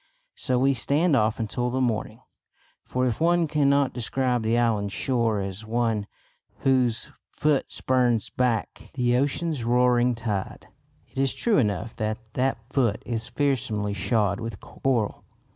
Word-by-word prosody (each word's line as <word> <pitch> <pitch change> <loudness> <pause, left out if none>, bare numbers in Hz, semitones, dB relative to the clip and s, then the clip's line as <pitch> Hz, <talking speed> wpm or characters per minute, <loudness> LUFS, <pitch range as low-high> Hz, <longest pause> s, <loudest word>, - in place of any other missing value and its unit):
So 125 - -1
we 135 +2 +3
stand 145 +6 +2
off 110 -2 +2
until 120 +2 -1
the 130 +2 -1
morning; 115 -2 -1 0.6
for 130 0 -1
if 125 +3 -1
one 170 0 +3
cannot 140 -2 +2
describe 125 0 0
the 110 +1 +1
island's 105 -4 +1
shore 115 -3 0
as 95 +2 -5
one 110 -2 -1 0.5
"whose 125 -4 +2 0.2
foot 150 -2 0
spurns 125 -4 +1
back 120 -7 -1
the 120 -1 +2
ocean's 145 +1 0
roaring 125 0 +3
tide," 105 -4 -4 0.4
it - - -8
is 135 -1 +1
true 230 -8 +2
enough 110 -1 -1
that 110 0 -1 0.2
that 130 0 +1 0.2
"foot" 120 -6 +1
is 115 -2 -3
fearsomely 120 -5 -1
shod 100 0 0
with 115 -3 -6
coral. 120 -6 -2
120 Hz, 145 wpm, -25 LUFS, 110-130 Hz, 0.6 s, we